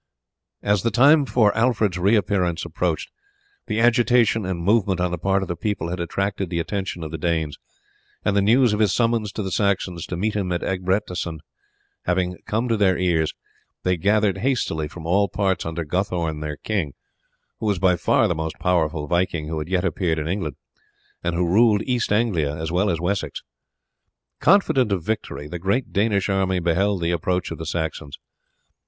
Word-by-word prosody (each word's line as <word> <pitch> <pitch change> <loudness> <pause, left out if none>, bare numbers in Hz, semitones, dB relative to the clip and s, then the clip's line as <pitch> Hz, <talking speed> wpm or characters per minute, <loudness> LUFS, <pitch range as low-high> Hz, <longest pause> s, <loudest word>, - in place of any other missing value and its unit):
As 105 -1 +2
the 115 - +1
time 140 +5 +5
for 110 -2 +3
Alfred's 110 -6 +1
reappearance 95 -4 +1
approached 85 -1 -2 0.6
the 110 - -1
agitation 120 -3 +3
and 90 -2 -2
movement 100 -2 +2
on 90 0 0
the 90 - -2
part 95 +2 +1
of - - -5
the 85 - -3
people 100 -1 -2
had 90 +1 -4
attracted 95 +2 -2
the 85 - -2
attention 90 0 -3
of 80 - -6
the 80 - -5
Danes, 80 -4 -1 0.7
and 100 - +2
the 100 - +4
news 115 +3 +4
of 105 - -1
his 105 -3 +3
summons 115 -2 +1
to 105 - -3
the 95 - -4
Saxons 95 -4 0
to 90 - -4
meet 105 +4 -1
him 95 -3 -1
at 85 - -1
Egbertesstan 90 -3 -2 0.6
having 90 0 0
come 115 +4 0
to 115 -2 +1
their 95 -3 +3
ears, 85 -4 +1 0.5
they 90 0 +2
gathered 100 +2 +2
hastily 105 - 0
from 85 +1 -10
all 100 +4 +2
parts 95 -3 -1
under 80 0 -3
Guthorn 85 -2 -1
their 75 -1 -5
king, 95 -10 -2 0.7
who 110 - -2
was 100 -2 +1
by 90 0 +3
far - - +2
the - - +1
most 80 0 -4
powerful 80 -4 0
viking 85 -1 -1
who 80 -1 -2
had 75 - -5
yet 95 0 +1
appeared 85 -3 0
in 75 0 -3
England, 80 -6 -2 0.7
and 85 -1 -1
who 90 +1 +1
ruled 105 +3 +4
East 125 -4 -1
Anglia 95 -10 +1
as 80 0 -4
well 90 +4 +2
as 85 - 0
Wessex. 95 +4 -2 1.0
Confident 140 - +3
of 95 -4 0
victory 105 -7 -3
the 90 +3 -6
great 100 +9 -1
Danish 100 -1 +1
army 95 -2 +1
beheld 90 +3 +1
the 85 - +1
approach 90 +1 -1
of - - -6
the 80 - -5
Saxons. 80 -4 -4
95 Hz, 185 wpm, -23 LUFS, 85-105 Hz, 1.0 s, time